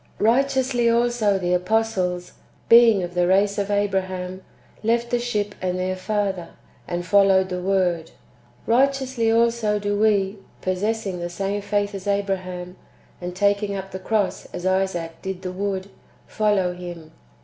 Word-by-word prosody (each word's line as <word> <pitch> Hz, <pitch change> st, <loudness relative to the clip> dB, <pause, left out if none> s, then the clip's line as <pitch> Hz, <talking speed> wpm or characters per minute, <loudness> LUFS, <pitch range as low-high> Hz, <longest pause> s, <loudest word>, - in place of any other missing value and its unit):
4. -, -, 0 dB
Righteously 260 Hz, -1 st, +2 dB
also 230 Hz, -3 st, +2 dB
the 180 Hz, -1 st, 0 dB
apostles, 180 Hz, -2 st, 0 dB, 0.4 s
being 230 Hz, -4 st, +7 dB
of 175 Hz, 0 st, -5 dB
the 175 Hz, 0 st, +2 dB
race 200 Hz, +2 st, +3 dB
of 200 Hz, 0 st, -2 dB
Abra 205 Hz, -1 st, +1 dB
ham, 185 Hz, 0 st, -6 dB, 0.4 s
left 235 Hz, +2 st, 0 dB
the 245 Hz, -, +2 dB
ship 210 Hz, -4 st, -2 dB
and 185 Hz, -1 st, -1 dB
their 185 Hz, 0 st, -1 dB
father, 190 Hz, -3 st, -2 dB, 0.4 s
and 175 Hz, 0 st, -3 dB
followed 195 Hz, -1 st, +4 dB
the 180 Hz, -, -3 dB
AYord. 180 Hz, -3 st, 0 dB, 0.6 s
Righteously 260 Hz, -1 st, +2 dB
also 230 Hz, -2 st, +2 dB
do 205 Hz, 0 st, -1 dB
we, 205 Hz, -1 st, +2 dB, 0.2 s
possessing 195 Hz, 0 st, -2 dB
the 175 Hz, 0 st, -4 dB
same 195 Hz, +3 st, -2 dB
faith 205 Hz, 0 st, -1 dB
as 195 Hz, 0 st, -7 dB
Abra 200 Hz, -1 st, +1 dB
ham, 180 Hz, 0 st, -8 dB, 0.4 s
and 180 Hz, 0 st, -5 dB
taking 200 Hz, +1 st, +1 dB
up 195 Hz, 0 st, -6 dB
the 190 Hz, -, -5 dB
cross 200 Hz, 0 st, -1 dB
as 175 Hz, -, -7 dB
Isaac 185 Hz, -3 st, -1 dB
did 190 Hz, -1 st, -5 dB
the 185 Hz, -, -3 dB
wood,^ 195 Hz, 0 st, -3 dB, 0.4 s
follow 205 Hz, -4 st, +1 dB
Him. 175 Hz, -3 st, -9 dB
195 Hz, 155 wpm, -23 LUFS, 185-215 Hz, 0.6 s, being